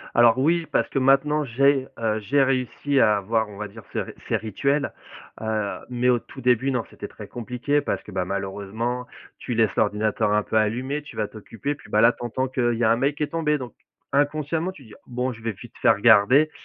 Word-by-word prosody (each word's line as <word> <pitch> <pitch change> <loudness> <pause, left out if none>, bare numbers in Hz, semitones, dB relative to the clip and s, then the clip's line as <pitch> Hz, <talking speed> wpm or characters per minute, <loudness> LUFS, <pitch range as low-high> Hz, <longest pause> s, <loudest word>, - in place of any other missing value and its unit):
Alors 120 -1 +6
oui, 165 +5 +2
parce - - +1
que - - 0
maintenant 140 +3 +3
j'ai, 135 +1 +2
heu, 110 -1 0
j'ai 135 +7 +2
réussi 135 +1 +1
à 105 -1 +5
avoir, 110 +2 0
on 105 - -11
va 105 +1 -4
dire, 110 +2 -12
ce - - 0 0.3
ces - - +2
rituels, 140 +7 -1 0.5
heu, 110 -2 -2
mais, 125 0 0
au 120 - +3
tout - - -12
début, 125 +2 +3
non. 125 -4 -1
C'était - - -8
très - - -11
compliqué 125 +5 -1
parce - - -3
que, 105 - -12
bah, 90 -1 -1
malheureusement, 100 +6 -3 0.3
tu 120 - -4
laisses 110 -3 +2
l'ordinateur 105 0 +1
un 105 0 +3
peu 110 - -3
allumé, 125 +7 0
tu 145 - -13
vas 105 -1 -1
t'occuper. 115 +6 -5
Puis, 150 - -16
bah, 105 - +3
là, 115 +1 +7
tu - - -13
entends 130 +3 -1
qu'il 120 -2 0
y 120 +1 0
a 110 - +4
un 115 - +4
mail 140 +4 +1
qui 150 - -5
est 150 - 0
tombé, 155 -2 0
donc 125 -3 -8 0.4
inconsciemment 155 +5 0
tu 150 - -15
te 120 - -16
dis: 105 - -13
«Bon, 125 +1 -2
je 115 - -12
vais 115 0 -2
vite 95 - -13
fait - - +3
regarder» 135 +10 +5
125 Hz, 225 wpm, -24 LUFS, 110-140 Hz, 0.5 s, là